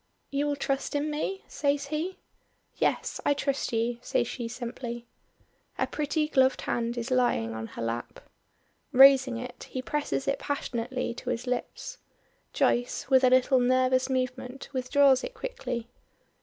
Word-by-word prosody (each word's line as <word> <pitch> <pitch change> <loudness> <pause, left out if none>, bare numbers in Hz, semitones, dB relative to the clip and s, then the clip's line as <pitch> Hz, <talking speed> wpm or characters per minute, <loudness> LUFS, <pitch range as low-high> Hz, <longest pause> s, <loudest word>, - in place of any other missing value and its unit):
"You 285 +1 0
will 290 - 0
trust 275 0 -2
in 295 +1 0
me?" 380 +6 -3
says 285 -1 0
he. 320 +5 -2 0.6
"Yes, - - 0
I 285 - +3
trust 275 -1 -1
you," 235 +1 0
says - - 0
she 240 -3 -4
simply. 240 0 -6 0.7
Her - - +1
pretty 300 +1 -1
gloved 265 -3 +3
hand 235 0 -2
is 240 +2 -3
lying 240 - +2
on 110 0 -5
her - - -6
lap. 115 +1 -4 0.7
Raising 265 -2 +7
it, 245 0 -7
he 255 - -4
presses 285 +1 -2
it 275 - +1
passionately 255 -3 -3
to 245 - -6
his 245 0 -2
lips. 255 - -4 0.5
Joyce, 245 0 0
with 260 0 +6
a 255 - +7
little 255 +1 +4
nervous 255 +1 +3
movement, 255 0 -3
withdraws 265 +1 +4
it - - -6
quickly. 255 - -4
260 Hz, 150 wpm, -28 LUFS, 245-280 Hz, 0.7 s, Raising